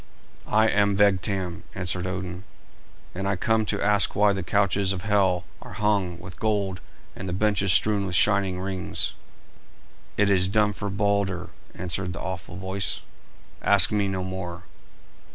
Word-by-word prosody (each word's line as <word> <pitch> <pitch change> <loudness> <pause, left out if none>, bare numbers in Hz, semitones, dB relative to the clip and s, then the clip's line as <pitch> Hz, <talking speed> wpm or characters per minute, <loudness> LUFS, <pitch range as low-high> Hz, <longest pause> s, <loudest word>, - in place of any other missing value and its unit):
"I 110 +1 +3
am 100 -2 +2
Vegtam," 95 -3 +1
answered 90 +1 -2
Odin, 90 -1 -5 0.7
"and 95 +2 -3
I 100 - +1
come 110 +3 +1
to 105 - -1
ask 105 0 +3
why 105 0 +4
the 95 - -3
couches 100 +1 +1
of 90 -2 -6
Hel 95 -4 +2 0.2
are - - -10
hung 100 -5 0
with 90 0 -11
gold 100 -5 -1 0.3
and 95 -1 -6
the - - -3
benches 100 -1 +1
strewn 100 +2 +2
with 90 - -3
shining 95 -1 +2
rings?" 95 -1 -2 1.0
"It 100 -1 +3
is 95 -1 +3
done 105 +1 +2
for 100 0 -4
Balder," 100 -3 -1 0.2
answered 90 0 -3
the - - -7
awful 95 0 -6
voice; 95 +1 -2 0.6
"ask 100 -3 +7
me 105 -2 +1
no 95 -1 -2
more." 95 -2 -6
95 Hz, 155 wpm, -25 LUFS, 90-100 Hz, 1.0 s, ask